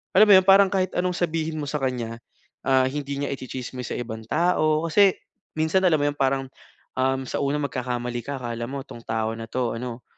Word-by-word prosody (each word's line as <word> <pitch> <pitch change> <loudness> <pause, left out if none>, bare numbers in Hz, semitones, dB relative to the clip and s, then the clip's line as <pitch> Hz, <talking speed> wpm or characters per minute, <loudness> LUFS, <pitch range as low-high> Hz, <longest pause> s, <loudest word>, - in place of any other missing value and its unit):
alam 210 +3 +8
mo - - +9
'yon, 185 - +3
parang 195 0 +7
kahit 185 -2 +1
anong 180 0 +1
sabihin 160 -2 -1
mo 145 - -4
sa 150 - -1
kanya, 120 -3 -2 0.5
ah, 130 -1 +4
hindi 140 0 -4
niya - - -2
itsi-tsismis 130 -1 -6
sa - - -3
ibang 110 -2 -6
tao. 155 -1 +2
Kasi, 195 +3 +5 0.4
minsan, 160 +4 +2
alam 170 -4 +4
mo 145 - +1
'yong, 145 - -6
parang, 135 0 +2 0.5
um, 130 0 +1
sa - - -3
unang 145 +1 0
magkakamali 125 -1 -3
ka 140 -1 -4
akala 120 -1 -4
mo 140 0 -4
'tong 115 - -11
tao 110 0 -1
na 115 - -6
'to 125 -2 -1
ano, 120 0 -6
135 Hz, 205 wpm, -24 LUFS, 125-160 Hz, 0.5 s, mo